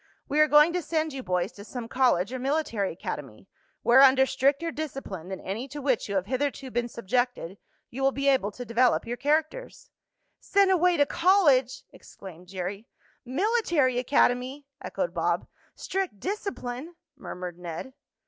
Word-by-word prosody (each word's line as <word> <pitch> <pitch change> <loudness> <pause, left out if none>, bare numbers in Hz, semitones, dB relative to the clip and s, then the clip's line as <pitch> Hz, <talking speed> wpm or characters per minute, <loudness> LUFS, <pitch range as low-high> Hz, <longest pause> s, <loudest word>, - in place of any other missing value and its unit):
"We 295 +2 0
are 305 - +6
going 300 +3 +6
to 360 - 0
send 315 -2 -1
you 270 - -5
boys 180 -2 -1
to 200 - -12
some 235 +2 -7
college 245 -5 +1
or 255 - -3
military 260 -7 -1
academy, 150 - -7 0.4
where, 250 +3 +6
under 265 -1 +6
stricter 280 +5 +1
discipline 270 - -6
than 190 - -5
any 220 +8 -5
to 290 +2 -8
which 260 -6 0
you 200 - -2
have 190 -1 0
hitherto 260 +2 -2
been 240 0 -1
subjected, 235 -4 -2 0.3
you 265 - -6
will 270 0 +3
be 275 +1 -2
able 265 -7 +3
to 245 - -7
develop 240 +2 +2
your 235 +1 -3
characters." 310 - -2 0.5
"Sent 395 -1 +3
away 360 -1 +3
to 285 - +4
college!" 290 -9 +3
exclaimed 180 -2 -13
Jerry. 195 +4 -5 0.4
"Military 310 - +1
academy!" 255 +1 +1 0.2
echoed - - -3
Bob. - - 0 0.3
"Strict 380 - -3
discipline!" 340 - -5 0.2
murmured 180 -9 -7
Ned. 175 +9 -7
260 Hz, 160 wpm, -27 LUFS, 210-300 Hz, 0.5 s, are